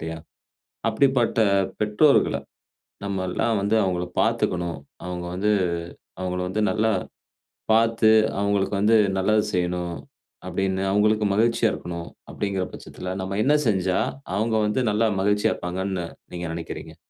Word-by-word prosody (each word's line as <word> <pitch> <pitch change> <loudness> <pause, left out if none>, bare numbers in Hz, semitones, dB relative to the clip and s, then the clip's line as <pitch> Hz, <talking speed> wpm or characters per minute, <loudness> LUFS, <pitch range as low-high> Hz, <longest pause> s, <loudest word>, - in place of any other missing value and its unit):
இல்லயா? 80 0 -5 0.7
அப்பிடிப்பட்ட 125 -1 +2 0.4
பெற்றோர்கள 105 +8 +3 0.7
நம்மெல்லாம் 100 +3 -1
வந்து 100 +3 +1
அவுங்கள 90 -2 -1
பார்த்துக்கணும். 85 -4 0 0.3
அவுங்க 90 -1 -4
வந்து 105 +3 +1 0.7
அவுங்கள 90 0 -2
வந்து 105 +3 -1
நல்லா 110 0 +1 0.8
பார்த்து, 115 -1 +4 0.3
அவுங்களுக்கு 100 0 +1
வந்து 110 +2 +4 0.2
நல்லது 105 +3 +3
செய்யணும் 90 -1 -1 0.5
அப்பிடின்னு 95 +1 -1
அவுங்களுக்கு 105 +1 +3
மகிழ்ச்சியா 115 +3 +3
இருக்கணும் 85 -1 -6 0.2
அப்பிடிங்கிற 95 -2 -2
பட்சத்தில, 90 0 -7
நம்ம 95 +1 -3
என்ன 145 - +3
செஞ்சா 95 -3 +1 0.4
அவுங்க 110 +2 0
வந்து 105 - 0
நல்லா 110 +2 +2
மகிழ்ச்சியா 105 +2 +2
இருப்பாங்கன்னு 95 0 -3 0.3
நீங்க 90 0 -4
நெனைக்கிறீங்க? 85 -1 -7
100 Hz, 115 wpm, -24 LUFS, 90-110 Hz, 0.8 s, பார்த்து